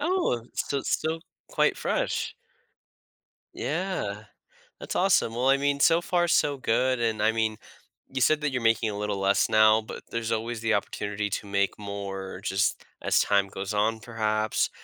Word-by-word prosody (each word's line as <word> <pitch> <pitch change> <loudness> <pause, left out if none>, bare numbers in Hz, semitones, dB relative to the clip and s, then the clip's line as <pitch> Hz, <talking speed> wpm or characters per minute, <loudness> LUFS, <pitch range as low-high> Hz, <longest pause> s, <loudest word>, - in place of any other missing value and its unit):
Oh, 300 - 0
so 140 -1 -1
still 160 +1 -1 0.3
quite - - +2
fresh. - - -1 1.2
Yeah. 150 - -3 0.6
That's - - -6
awesome, 115 - +3
well, 125 +2 +1
I 135 - +6
mean, 140 0 0
so 165 +4 +5
far 175 0 +1
so 145 -3 +2
good, 130 0 +1
and, 110 -2 0
I 110 - +4
mean, 110 -1 0 0.5
you 135 - -3
said 155 +3 +3
that 150 -2 0
you're 125 - -2
making 115 -1 +2
a 100 - -5
little 105 -1 -2
less 95 +1 +2
now, 110 0 +6
but 110 - -9
there's 115 0 -1
always 115 +1 -3
the 115 0 +1
opportunity 105 +1 -2
to 100 - -4
make 100 +1 0
more 100 -2 -6
just 95 -1 0 0.2
as - - +2
time 100 -1 +3
goes 95 +2 -5
on 110 +2 +1
perhaps 110 -2 0
110 Hz, 165 wpm, -27 LUFS, 105-135 Hz, 1.2 s, I